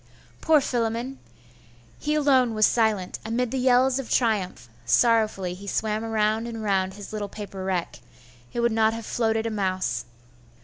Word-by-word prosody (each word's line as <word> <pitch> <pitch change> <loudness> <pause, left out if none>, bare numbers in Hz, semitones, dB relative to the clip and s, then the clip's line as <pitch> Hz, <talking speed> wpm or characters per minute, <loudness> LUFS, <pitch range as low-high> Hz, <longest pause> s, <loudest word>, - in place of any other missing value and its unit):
Poor 315 -1 +5
Philammon! 240 +1 -2 0.8
He 300 0 -1
alone 260 -6 +3
was 215 0 +5
silent, 215 -6 +1
amid 230 +2 -1
the 265 - -1
yells 255 +1 +3
of 265 - -6
triumph; 210 - 0 0.2
sorrowfully 215 - +2
he 200 +3 -10
swam 215 +2 -1
round 220 0 0
and 225 -2 -6
round 190 -2 0
his 205 +1 -10
little 205 -1 -3
paper 195 -2 -7
wreck.... 185 -3 -2 0.5
it 240 - -2
would 235 0 +2
not 220 0 +2
have 230 -1 -7
floated 225 -1 0
a 225 - -1
mouse. 190 -3 -1
220 Hz, 160 wpm, -25 LUFS, 205-240 Hz, 0.8 s, Poor